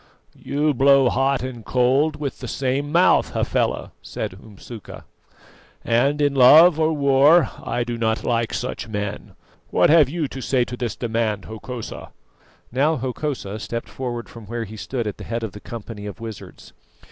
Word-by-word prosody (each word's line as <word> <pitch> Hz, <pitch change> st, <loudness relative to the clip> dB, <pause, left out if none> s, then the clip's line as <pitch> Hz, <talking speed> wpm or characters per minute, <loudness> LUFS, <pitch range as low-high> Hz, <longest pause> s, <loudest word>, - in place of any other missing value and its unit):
"You 150 Hz, +1 st, 0 dB
blow 135 Hz, 0 st, +5 dB
hot 135 Hz, 0 st, +1 dB
and 125 Hz, -3 st, -6 dB
cold 130 Hz, +7 st, +2 dB
with 145 Hz, -2 st, -5 dB
the -, -, -6 dB
same 140 Hz, +2 st, -2 dB
mouth, 175 Hz, +3 st, +3 dB
Hafela," -, -, -1 dB
said -, -, -5 dB
Umsuka, 105 Hz, +2 st, -11 dB, 0.8 s
"and 135 Hz, +6 st, +2 dB
in 145 Hz, -1 st, +2 dB
love 155 Hz, +6 st, +7 dB
or 160 Hz, 0 st, +3 dB
war 145 Hz, +3 st, +4 dB
I 120 Hz, -, -1 dB
do 120 Hz, -1 st, -5 dB
not 110 Hz, -1 st, 0 dB
like 115 Hz, -1 st, 0 dB
such 125 Hz, -1 st, -4 dB
men. 105 Hz, -1 st, -5 dB, 0.3 s
What -, -, +3 dB
have 155 Hz, -5 st, +6 dB
you 160 Hz, -1 st, -2 dB
to 135 Hz, -, -8 dB
say 125 Hz, -1 st, +1 dB
to 125 Hz, -, -6 dB
this 120 Hz, -2 st, -3 dB
demand, 110 Hz, -4 st, -2 dB
Hokosa?" 110 Hz, +2 st, -7 dB, 0.6 s
Now 145 Hz, +6 st, +2 dB
Hokosa 125 Hz, -5 st, -4 dB
stepped 115 Hz, +2 st, -5 dB
forward 120 Hz, -3 st, -5 dB
from 115 Hz, -3 st, -12 dB
where 120 Hz, +1 st, -3 dB
he 110 Hz, 0 st, -9 dB
stood 120 Hz, +2 st, -4 dB
at 105 Hz, -, -4 dB
the -, -, -9 dB
head 115 Hz, +1 st, -4 dB
of 110 Hz, -, -4 dB
the 105 Hz, -, -10 dB
company 110 Hz, -2 st, -8 dB
of 105 Hz, -, -8 dB
wizards. 115 Hz, -2 st, -10 dB
125 Hz, 170 wpm, -22 LUFS, 115-140 Hz, 0.8 s, love